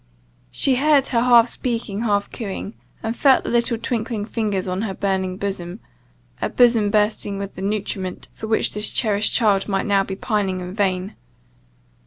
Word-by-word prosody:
She 260 - +2
heard 285 -1 +3
her 235 -2 +2
half 240 -1 +6
speaking 230 -4 -3
half 205 -3 0
cooing, 205 -2 -5 0.3
and 225 +1 -2
felt 270 0 +4
the - - -4
little 235 -1 +1
twinkling 225 -2 -3
fingers 210 -4 -2
on 185 +1 -2
her 205 -4 -3
burning 190 -2 -1
bosom 190 -3 -4 0.6
a - - 0
bosom 230 -4 +4
bursting 210 -1 0
with 200 0 -5
the - - -9
nutriment 195 -2 -3
for 220 - -8
which 220 - +1
this 210 0 +1
cherished 210 -2 +1
child 205 -5 +2
might 195 -2 -1
now 200 -2 +3
be 190 0 -5
pining 200 -3 -1
in 180 0 -6
vain. 190 -1 -1
210 Hz, 170 wpm, -21 LUFS, 195-230 Hz, 0.6 s, half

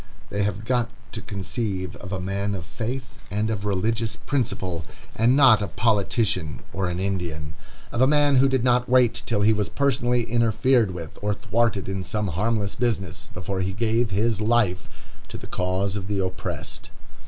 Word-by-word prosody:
They 100 - 0
have 100 +1 -1
got 120 -1 +1 0.2
to - - -5
conceive 95 -3 -3
of 95 - -9
a 95 - -2
man 100 +2 -2
of 90 -4 -6
faith 125 - -4 0.3
and 105 +2 0
of 105 -2 -3
religious 110 +3 0
principle, 105 - -2 0.3
and 115 +4 +4
not 130 -7 +7
a 100 - -1
politician 105 - 0
or 95 -1 -1
an 90 0 -3
Indian; 85 -6 -3 0.4
of 120 - -1
a 130 - +6
man 145 -1 +4
who 135 +1 +5
did 130 -3 +1
not 125 0 +2
wait 125 -2 +4
till 105 -3 +1
he 110 +2 +5
was 105 -2 -1
personally 125 -3 +1
interfered 115 0 +2
with, 85 -4 -7
or 105 0 0
thwarted 115 -2 0
in 95 -1 -2
some 100 +3 -2
harmless 105 +4 0
business, 100 -8 -2
before 95 +1 -3
he 95 +1 -1
gave 115 +2 +1
his 105 +2 0
life 105 -5 +1 0.4
to - - -7
the - - -10
cause 95 +2 -1
of 100 -1 -4
the 100 -1 -1
oppressed. 95 -1 -4
105 Hz, 175 wpm, -24 LUFS, 95-120 Hz, 0.4 s, not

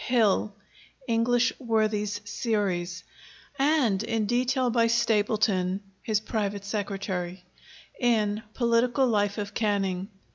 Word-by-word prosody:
Hill 215 -4 +2 0.5
(English 240 +2 +2
Worthies 215 -4 0
Series), 195 -6 -2 0.6
and 270 -9 +3
in 225 -1 -1
detail 250 +2 +1
by 230 -1 +3
Stapleton 210 -5 +1 0.2
(his 215 -2 0
private 205 -3 -3
secretary) 195 -3 -3 0.6
in 215 -4 +1
'Political 240 +2 +2
Life 205 -4 +1
of 205 -1 -4
Canning.' 195 -4 0
215 Hz, 100 wpm, -27 LUFS, 200-235 Hz, 0.6 s, and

